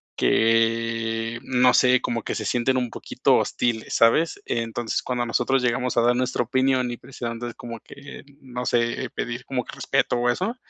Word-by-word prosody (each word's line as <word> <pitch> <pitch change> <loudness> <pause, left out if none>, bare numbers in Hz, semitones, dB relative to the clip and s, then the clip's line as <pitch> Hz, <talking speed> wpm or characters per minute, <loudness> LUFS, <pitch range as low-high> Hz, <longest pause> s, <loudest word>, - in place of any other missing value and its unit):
que 115 0 +1
no 125 -1 +3
sé, 125 0 +5
como 115 -1 -2
que - - -3
se 110 - -4
sienten 125 +3 +1
un 125 -2 -1
poquito - - 0
hostiles, 115 -2 -1
¿sabes? 160 - +3
Entonces, 115 0 -2
cuando 120 -1 -2
nosotros 125 +3 +1
llegamos 125 0 0
a - - +6
dar 120 +1 +3
nuestra 125 -1 0
opinión, 130 0 +1
y 120 - -4
precisamente 120 -2 -6
es - - -11
como 115 -1 -8
que, 140 +1 -12 0.2
no 125 -1 -6
sé, 120 -1 0
eh, - - -6
pedir 120 +2 -5
como 125 -2 -3
que - - -9
respeto - - 0
o 120 0 +1
eso. 190 - -1
120 Hz, 185 wpm, -24 LUFS, 115-125 Hz, 0.2 s, a